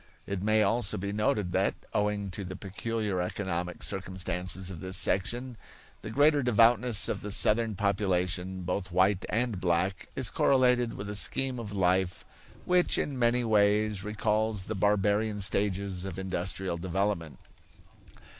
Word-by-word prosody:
It 100 -2 -4
may 110 +1 +3
also 110 -2 +1
be 100 +1 -4
noted 105 -3 0
that, - - +1 0.2
owing 105 -1 -1
to 100 +3 -5
the 95 0 -7
peculiar 100 0 -3
economic 90 -1 -3
circumstances 95 -1 -2
of 85 - -8
this 95 +2 0
section, 120 +7 0 0.4
the - - -7
greater 145 +5 +3
devoutness 115 -2 +3
of - - -3
the 105 - -6
Southern 110 +2 +3
population, 95 -2 -1
both 90 +1 -3
white 95 +2 +2
and 115 -4 -1
black, 90 +2 0
is - - -1
correlated 125 -3 +2
with 100 - -6
a 105 - -5
scheme 130 +4 +2
of 110 -3 -6
life 95 -2 0 0.4
which 180 0 +3
in 135 -3 -2
many 120 +1 +3
ways 105 -2 +2
recalls 105 -1 -1
the 110 - -4
barbarian 105 +1 +1
stages 100 -1 0
of 95 -1 -6
industrial 95 -1 -3
development. 85 -4 -2
100 Hz, 145 wpm, -29 LUFS, 95-110 Hz, 0.4 s, may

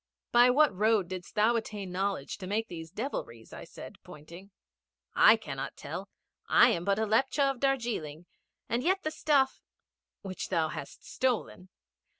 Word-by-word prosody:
'By 240 +1 +6
what 280 -3 +4
road 210 -2 +2
didst 185 +1 -8
thou 220 +3 +3
attain 210 -4 -4
knowledge 190 -6 -3
to 185 - -7
make 220 +3 -1
these 165 -2 -8
devilries?' 165 - -6
I - - -9
said, - - -11
pointing. 170 +6 -13 0.6
'I - - +7
cannot - - -6
tell. - - -7 0.4
I - - +6
am 170 - -1
but 200 +1 +1
a 220 - 0
Lepcha 270 +5 +2
of 265 - -9
Darjeeling, 230 - -2 0.4
and 235 +1 -1
yet 375 +7 +1
the 310 - -2
stuff 280 -4 +1 0.3
' - - -63
'Which 190 -2 -6
thou 165 -4 +1
hast 140 - -9
stolen.' 240 -7 -2
210 Hz, 160 wpm, -29 LUFS, 180-250 Hz, 0.6 s, I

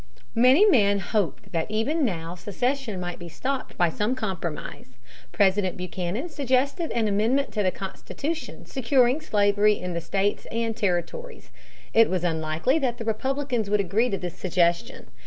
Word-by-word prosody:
Many 255 - +6
men 205 - +4
hoped 195 - -2
that 165 0 -1
even 265 +10 0
now 170 -8 -2
secession 225 +4 -2
might 175 -1 -5
be 175 -1 -8
stopped 265 - -4
by 175 -1 +3
some 210 +9 -1
compromise. 170 - -5 0.3
President 190 -1 +2
Buchanan 180 - -3
suggested 280 +2 0
an 230 -2 +1
amendment 225 +7 +1
to 215 - -1
the 190 - +3
Constitution, 275 - -5
securing 260 +1 +2
slavery 205 -4 +3
in 180 -1 -4
the 170 - -2
states 195 +4 -1
and 230 -1 -1
territories. 325 - -3 0.4
It 225 0 +6
was 180 -2 -1
unlikely 160 - +1
that 250 -5 -1
the 230 - -6
Republicans 245 0 -1
would 210 0 +2
agree 200 +6 +1
to 195 - -1
this 180 -1 -5
suggestion. 175 -2 0
210 Hz, 155 wpm, -25 LUFS, 180-255 Hz, 0.4 s, Many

